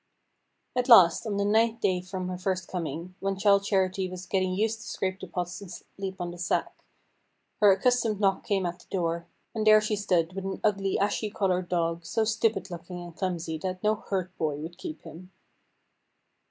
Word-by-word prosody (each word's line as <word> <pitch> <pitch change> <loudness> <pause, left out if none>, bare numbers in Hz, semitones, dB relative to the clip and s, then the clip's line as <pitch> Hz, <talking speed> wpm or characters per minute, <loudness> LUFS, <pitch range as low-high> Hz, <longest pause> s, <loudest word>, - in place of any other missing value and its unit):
At 250 +1 0
last, 185 -3 +7
on 205 -2 -1
the 200 - +1
ninth 225 +2 +2
night 180 -1 +1
from 185 -1 -4
her 180 - -4
first 185 -1 -2
coming, 170 0 -4
when 195 0 -1
Childe 200 0 +4
Charity 190 -1 +1
was 185 0 -7
getting 185 0 0
used 220 +3 0
to 235 - -10
scrape 190 0 -2
the - - -7
pots 175 +1 -4
and 200 - -9
sleep 190 0 -7
on 175 -1 -3
the 175 - -10
sack, 175 - -1 0.8
her 205 -1 +7
accustomed 225 +1 +2
knock 195 -2 +2
came 195 -3 0
at 175 +1 -3
the - - -18
door, 170 -2 -1 0.3
and 220 -2 -1
there 215 0 +9
she 215 0 -1
stood 180 -4 +1
with 195 0 -5
an 195 0 -4
ugly 195 -2 +1
ashy 205 +2 0
coloured 185 -3 0
dog, 170 -1 0
so 225 +6 0
stupid 220 -3 0
looking 175 +1 -7
and 175 -1 -9
clumsy 170 -4 -3
that 185 +2 -4
no 210 0 +4
herd 185 -3 -4
boy 155 -2 0
would 165 +4 -8
keep 155 -4 -7
him. 180 +3 -11
190 Hz, 195 wpm, -28 LUFS, 175-205 Hz, 0.8 s, there